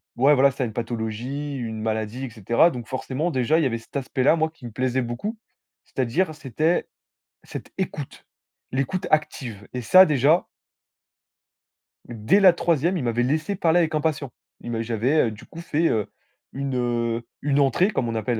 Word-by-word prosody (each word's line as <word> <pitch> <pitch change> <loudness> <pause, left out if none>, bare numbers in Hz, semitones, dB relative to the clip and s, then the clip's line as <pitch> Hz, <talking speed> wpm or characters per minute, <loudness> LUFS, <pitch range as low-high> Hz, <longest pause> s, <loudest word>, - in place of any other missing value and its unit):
ouais, 140 +4 +5
voilà, 140 0 +5
c'est 130 - -18
ça 130 - +1
une 110 - -6
pathologie, 120 +5 -4
une 110 -3 -5
maladie 110 +3 -2
et - - -6
cetera 115 - +3
donc 120 -2 -7
forcément, 135 +5 -2
déjà, 140 +4 +2
il - - +2
y - - +2
avait 115 -2 -2
cet 115 +4 -18
aspect-là, 135 +2 +2
moi, 160 0 +1
qui 125 - -14
me 120 - -7
plaisait 130 +2 0
beaucoup 125 - -4 0.5
c'est-à-dire 155 +7 -1
c'était 155 +4 0 0.6
cette - - -9
écoute, 155 -7 -5 0.5
l'écoute 135 +8 -1
active 125 -9 -1
et 125 - -3
ça, 185 +11 +8
déjà 150 +2 +3 1.6
dès 115 - +2
la 190 -3 +7
3e, 170 +1 +1
il 155 - -3
m'avait 120 0 0
laissé 155 +9 0
parler 175 -1 +3
avec 165 -2 +1
un 155 - +1
patient. 145 -4 -1 0.3
Il 120 - -6
m'a 115 -1 -1
j'avais, 120 +7 +1
heu, - - -3
du 105 - -12
coup, 165 - -11
fait, 165 0 +1
heu, 110 -3 0 0.5
une, 135 -1 -3
heu, 120 -1 -1 0.2
une 145 0 +1
entrée 145 - +3
comme 130 - -1
on 115 - -3
appelle, 115 +1 -1
130 Hz, 185 wpm, -24 LUFS, 115-155 Hz, 1.6 s, ça